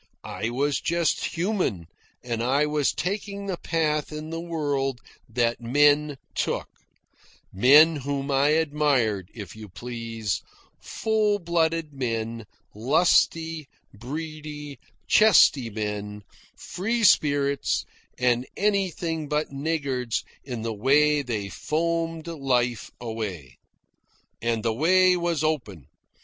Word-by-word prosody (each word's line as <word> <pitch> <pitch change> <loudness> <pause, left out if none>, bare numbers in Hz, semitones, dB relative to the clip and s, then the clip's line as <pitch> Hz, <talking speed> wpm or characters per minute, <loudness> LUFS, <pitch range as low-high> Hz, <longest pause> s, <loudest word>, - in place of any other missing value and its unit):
I 115 - -3
was 140 +4 0
just 170 -2 0
human, 170 - -1 0.4
and 115 -2 -3
I 135 +5 +2
was 150 -2 +1
taking 200 +2 -4
the 190 -3 -3
path 155 -3 -1
in 155 +1 -6
the 165 0 -4
world 145 -6 -2 0.3
that 120 +1 0
men 145 +4 +3 0.2
took - - -1 0.9
men 150 - +6
whom 140 0 -3
I 135 +1 +3
admired, 145 - +1
if 100 -4 -8
you 110 -2 -10
please; 115 -1 -4 0.4
full 215 -2 0
blooded 165 -3 0
men, 115 -4 -3 0.3
lusty, 160 - +2 0.3
breedy, 150 +2 -7 0.3
chesty 150 - +5
men, 105 -1 -5 0.3
free 225 +5 -2
spirits 140 -6 +3 0.3
and 125 0 +1
anything 175 -6 -1
but 150 0 -1
niggards 140 -5 -2 0.2
in 120 -5 -5
the 115 -1 -2
way 145 +7 +3
they 110 -7 -3
foamed 165 - -2
life 125 -8 -1
away. 105 - -6 0.8
And 115 -1 -1
the 115 -1 +1
way 185 +8 +4
was 170 -3 -1
open. 120 - -2
145 Hz, 110 wpm, -25 LUFS, 115-165 Hz, 0.9 s, men